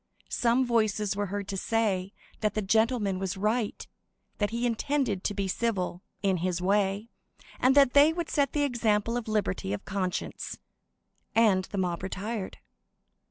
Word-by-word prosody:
Some 245 Hz, +2 st, +2 dB
voices 215 Hz, -4 st, +1 dB
were 205 Hz, 0 st, -1 dB
heard 200 Hz, +1 st, -4 dB
to 195 Hz, -, -2 dB
say 200 Hz, -3 st, 0 dB, 0.3 s
that 215 Hz, -1 st, 0 dB
the 215 Hz, -, 0 dB
gentleman 220 Hz, -2 st, +2 dB
was 190 Hz, 0 st, -3 dB
right; 215 Hz, +2 st, -1 dB, 0.5 s
that 205 Hz, -1 st, +1 dB
he 235 Hz, +2 st, -2 dB
intended 240 Hz, -3 st, 0 dB
to 205 Hz, -, 0 dB
be 195 Hz, -1 st, -1 dB
civil, 185 Hz, -4 st, -1 dB, 0.2 s
in 190 Hz, -2 st, +2 dB
his 180 Hz, 0 st, -1 dB
way, 200 Hz, +3 st, +1 dB, 0.5 s
and 260 Hz, +2 st, +4 dB
that 275 Hz, -3 st, +6 dB
they 290 Hz, +2 st, +7 dB
would 340 Hz, +1 st, -4 dB
set 285 Hz, -3 st, +1 dB
the 295 Hz, -, +1 dB
example 230 Hz, -4 st, +1 dB
of 240 Hz, -2 st, -3 dB
liberty 205 Hz, -, -1 dB
of 105 Hz, -, -5 dB
conscience,—and 190 Hz, +1 st, -2 dB
the 200 Hz, -, -6 dB
mob 180 Hz, -2 st, -1 dB
retired. 195 Hz, +2 st, -4 dB
210 Hz, 155 wpm, -28 LUFS, 190-235 Hz, 0.5 s, they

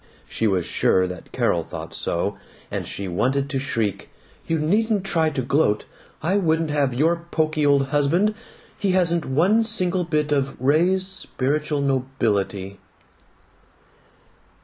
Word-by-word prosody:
She 115 Hz, -, 0 dB
was 95 Hz, -4 st, +1 dB
sure 95 Hz, 0 st, +2 dB
that 90 Hz, -2 st, -8 dB
Carol -, -, +1 dB
thought -, -, -8 dB
so, 100 Hz, +4 st, -2 dB, 0.4 s
and -, -, -3 dB
she 100 Hz, -, -5 dB
wanted 130 Hz, -, 0 dB
to 135 Hz, -, 0 dB
shriek, 115 Hz, -8 st, -2 dB, 0.4 s
"You 165 Hz, -, +1 dB
needn't 205 Hz, +6 st, +1 dB
try 165 Hz, -5 st, +1 dB
to 140 Hz, -4 st, -3 dB
gloat! 130 Hz, -5 st, +1 dB, 0.4 s
I 185 Hz, +5 st, +2 dB
wouldn't 160 Hz, -4 st, +1 dB
have 140 Hz, -4 st, +1 dB
your 170 Hz, +5 st, +1 dB
pokey 155 Hz, -2 st, +1 dB
old 140 Hz, -1 st, +3 dB
husband. 155 Hz, +9 st, +2 dB, 0.5 s
He 195 Hz, -2 st, +1 dB
hasn't 170 Hz, -3 st, +2 dB
one 180 Hz, +12 st, +3 dB
single 185 Hz, -5 st, 0 dB
bit 150 Hz, -3 st, -1 dB
of 135 Hz, -2 st, 0 dB
Ray's 170 Hz, +8 st, +2 dB
spiritual 150 Hz, -5 st, -2 dB
nobility." 110 Hz, -8 st, -1 dB
150 Hz, 135 wpm, -23 LUFS, 130-170 Hz, 0.5 s, old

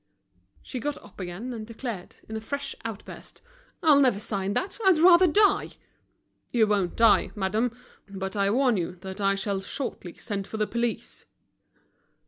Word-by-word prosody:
She 255 Hz, -, -5 dB
got 295 Hz, +4 st, -3 dB
up 205 Hz, -, -16 dB
again, 190 Hz, +7 st, -5 dB
and 220 Hz, -2 st, -7 dB
declared 230 Hz, -5 st, -6 dB
in 220 Hz, -, -6 dB
a 220 Hz, -, -4 dB
fresh 280 Hz, +4 st, -3 dB
outburst: 225 Hz, -3 st, -8 dB, 0.4 s
"I'll 300 Hz, -3 st, +6 dB
never 250 Hz, -7 st, +3 dB
sign 200 Hz, -1 st, -2 dB
that, 385 Hz, -, -2 dB
I'd 380 Hz, -4 st, +5 dB
rather 350 Hz, +2 st, +7 dB
die." 410 Hz, +5 st, +3 dB, 0.8 s
"You 230 Hz, -3 st, +4 dB
won't 200 Hz, -4 st, 0 dB
die, 230 Hz, -2 st, +5 dB
madame; 220 Hz, +4 st, -1 dB, 0.3 s
but 195 Hz, 0 st, -5 dB
I 200 Hz, -1 st, +2 dB
warn 245 Hz, 0 st, +3 dB
you 180 Hz, 0 st, -3 dB
that 190 Hz, +1 st, -7 dB
I 195 Hz, 0 st, +3 dB
shall 195 Hz, 0 st, -2 dB
shortly 195 Hz, -5 st, -5 dB
send 200 Hz, -3 st, -4 dB
for 220 Hz, -, -6 dB
the 215 Hz, -, +1 dB
police." 235 Hz, +1 st, -3 dB
220 Hz, 160 wpm, -26 LUFS, 195-255 Hz, 0.8 s, rather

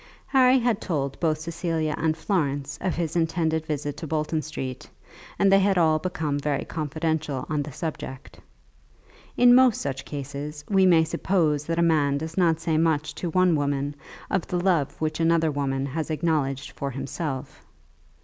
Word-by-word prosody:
Harry 260 Hz, -1 st, +5 dB
had 235 Hz, -4 st, +1 dB
told 140 Hz, -6 st, -2 dB
both 155 Hz, -2 st, +1 dB
Cecilia 160 Hz, -1 st, -2 dB
and 160 Hz, 0 st, 0 dB
Florence 145 Hz, -9 st, -1 dB
of 185 Hz, -1 st, -1 dB
his 165 Hz, -1 st, -2 dB
intended 160 Hz, -1 st, 0 dB
visit 145 Hz, -1 st, -3 dB
to 160 Hz, -, -6 dB
Bolton 155 Hz, +1 st, -1 dB
Street, 135 Hz, -4 st, -6 dB, 0.5 s
and 195 Hz, -1 st, +4 dB
they 195 Hz, -, +7 dB
had 195 Hz, -1 st, +2 dB
all 160 Hz, -2 st, +4 dB
become 155 Hz, -5 st, -2 dB
very 145 Hz, -1 st, -1 dB
confidential 155 Hz, -3 st, -2 dB
on 150 Hz, -1 st, +1 dB
the 145 Hz, +1 st, -6 dB
subject. 135 Hz, -3 st, -6 dB, 1.0 s
In 245 Hz, 0 st, +7 dB
most 255 Hz, -2 st, +5 dB
such 135 Hz, -1 st, -3 dB
cases 145 Hz, +1 st, -6 dB
we 190 Hz, -2 st, +4 dB
may 165 Hz, -3 st, +6 dB
suppose 160 Hz, -3 st, 0 dB
that 165 Hz, +1 st, -2 dB
a 170 Hz, -, +3 dB
man 145 Hz, -4 st, +3 dB
does 160 Hz, +2 st, -5 dB
not 165 Hz, -4 st, +3 dB
say 165 Hz, -1 st, 0 dB
much 155 Hz, -2 st, +1 dB
to 175 Hz, -, -4 dB
one 185 Hz, 0 st, +3 dB
woman 145 Hz, 0 st, -1 dB, 0.4 s
of 190 Hz, -, 0 dB
the 180 Hz, -, -1 dB
love 175 Hz, -6 st, +1 dB
which 155 Hz, 0 st, -2 dB
another 165 Hz, -1 st, +3 dB
woman 135 Hz, -1 st, -1 dB
has 155 Hz, +4 st, -3 dB
acknowledged 150 Hz, -4 st, -1 dB
for 140 Hz, -, -4 dB
himself. 135 Hz, +1 st, -5 dB
160 Hz, 170 wpm, -25 LUFS, 145-170 Hz, 1.0 s, they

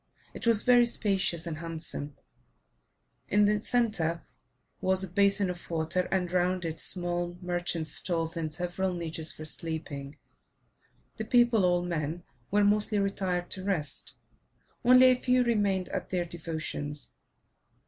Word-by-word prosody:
It -, -, -5 dB
was 225 Hz, -2 st, +5 dB
very 245 Hz, -1 st, +5 dB
spacious 190 Hz, -7 st, +1 dB
and 160 Hz, -3 st, -5 dB
handsome; 160 Hz, -3 st, -5 dB, 1.1 s
in 205 Hz, +1 st, +4 dB
the 210 Hz, 0 st, +1 dB
centre 200 Hz, -10 st, 0 dB, 0.6 s
was 190 Hz, 0 st, +2 dB
a -, -, -3 dB
basin 200 Hz, +2 st, +3 dB
of 175 Hz, -1 st, -10 dB
water, 165 Hz, +2 st, 0 dB
and 180 Hz, -2 st, 0 dB
round 180 Hz, 0 st, 0 dB
it 160 Hz, -1 st, -4 dB
small 175 Hz, -1 st, -1 dB
merchants' 175 Hz, -3 st, -1 dB
stalls 165 Hz, -1 st, +1 dB
and 160 Hz, -2 st, -3 dB
several 180 Hz, +2 st, -2 dB
niches 165 Hz, -2 st, -1 dB
for 155 Hz, -, -7 dB
sleeping. 155 Hz, -3 st, -6 dB, 1.0 s
The 220 Hz, -, -4 dB
people 235 Hz, -4 st, +4 dB
all 175 Hz, -1 st, +2 dB
men 170 Hz, -1 st, -3 dB, 0.3 s
were 205 Hz, +1 st, +2 dB
mostly 210 Hz, +1 st, +3 dB
retired 190 Hz, -3 st, -1 dB
to 190 Hz, -, -3 dB
rest; 175 Hz, -7 st, -2 dB, 0.7 s
only 255 Hz, +1 st, +7 dB
a -, -, +4 dB
few 250 Hz, 0 st, +2 dB
remained 205 Hz, -6 st, 0 dB
at -, -, -4 dB
their 180 Hz, -2 st, -1 dB
devotions. 155 Hz, -3 st, -3 dB
180 Hz, 140 wpm, -28 LUFS, 165-205 Hz, 1.1 s, only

